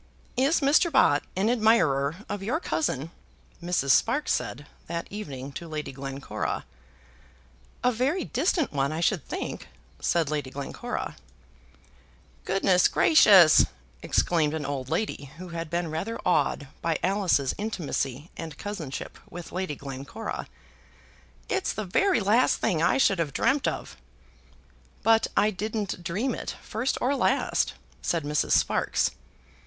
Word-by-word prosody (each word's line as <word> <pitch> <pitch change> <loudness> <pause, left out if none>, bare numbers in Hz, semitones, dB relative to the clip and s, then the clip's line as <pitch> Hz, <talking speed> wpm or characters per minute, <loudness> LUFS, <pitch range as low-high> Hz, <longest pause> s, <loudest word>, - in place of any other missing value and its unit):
"Is 275 +6 +2
Mr. 295 +5 +4
Bott 145 - +4
an 190 +3 +1
admirer 215 - +3
of 205 - -4
your 235 +11 -1
cousin?" 165 - -2 0.5
Mrs. 170 -6 +1
Sparkes 255 - +3
said 145 +4 -2 0.2
that 170 0 -3
evening 140 -10 -6
to 170 +5 -7
Lady 155 -1 -4
Glencora. 135 0 -4 1.2
"A 250 - +4
very 270 +10 0
distant 305 - 0
one 140 0 0
I 155 - -3
should 170 -2 +1
think," - - -5 0.3
said 165 -4 +1
Lady 145 -3 -2
Glencora. 140 +1 -5 1.3
"Goodness 190 -1 +3
gracious!" 195 - +7 0.3
exclaimed 160 -3 +1
an 155 -2 -3
old 135 -2 -4
lady 210 -9 -2
who 180 +1 -8
had 165 -1 -5
been 170 -1 -2
rather 200 +9 -3
awed 145 -4 +1
by 165 -1 0
Alice's 185 -8 +2
intimacy 160 - -3
and 160 -3 -7
cousinship 170 -10 -6
with 175 0 -8
Lady 185 -5 -3
Glencora; 135 0 -6 1.0
"it's - - -1
the 215 - -4
very 370 - +2
last 215 +6 +4
thing 160 -3 0
I 170 - +3
should 195 -8 +3
have 150 -5 -1
dreamt 265 - +2
of." 65 - -4 1.1
"But 225 0 +4
I 215 - +4
didn't 210 -2 -3
dream 210 +10 -1
it, - - -5
first 235 +5 -2
or 270 +3 +1
last," - - +1 0.3
said 170 -3 0
Mrs. 150 0 +1
Sparkes. - - +2
175 Hz, 135 wpm, -27 LUFS, 145-220 Hz, 1.3 s, gracious